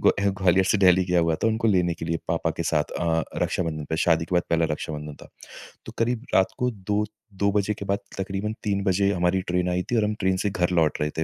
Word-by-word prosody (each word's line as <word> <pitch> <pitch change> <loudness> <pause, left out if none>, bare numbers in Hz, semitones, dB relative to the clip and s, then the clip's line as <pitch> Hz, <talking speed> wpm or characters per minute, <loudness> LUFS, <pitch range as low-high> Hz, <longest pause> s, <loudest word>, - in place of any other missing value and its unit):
ग्वा 100 0 +3
ग्वालियर 95 +1 +4
से 105 - +2
दिल्ली 90 -1 +5
गया 90 -1 +2
हुआ 80 -1 +1
था - - +5
उनको 110 0 +1
लेने 90 -4 +2
के 80 - -7
लिए 85 0 -1
पापा - - 0
के - - 0
साथ। 75 -1 +1 0.2
अ 85 - 0
अ, 80 0 +1 0.2
रक्षाबंधन 80 -4 -2
पे 80 - 0
शादी 80 -1 +2
के 90 - -4
बाद 85 - +3
पहला 85 0 +3
रक्षाबंधन 75 -1 -5
था। - - -12 0.6
तो - - -8
क़रीब 120 +1 -1
रात 95 - +5
को 125 -1 +1
2-2 105 0 -2
बजे 105 +1 +1
के 100 - -8
बाद 100 0 0 0.2
तक़रीबन 95 +3 -3
3 100 -1 0
बजे 100 +1 +2
हमारी 90 +1 +1
ट्रेन 90 0 +1
आई 90 0 0
थी - - +2
और 110 - +3
हम 105 0 0
ट्रेन 95 0 +2
से - - +3
घर 90 -2 0
लौट 75 0 0
रहे 75 - +1
थे। 80 - +1
95 Hz, 250 wpm, -25 LUFS, 85-100 Hz, 0.6 s, दिल्ली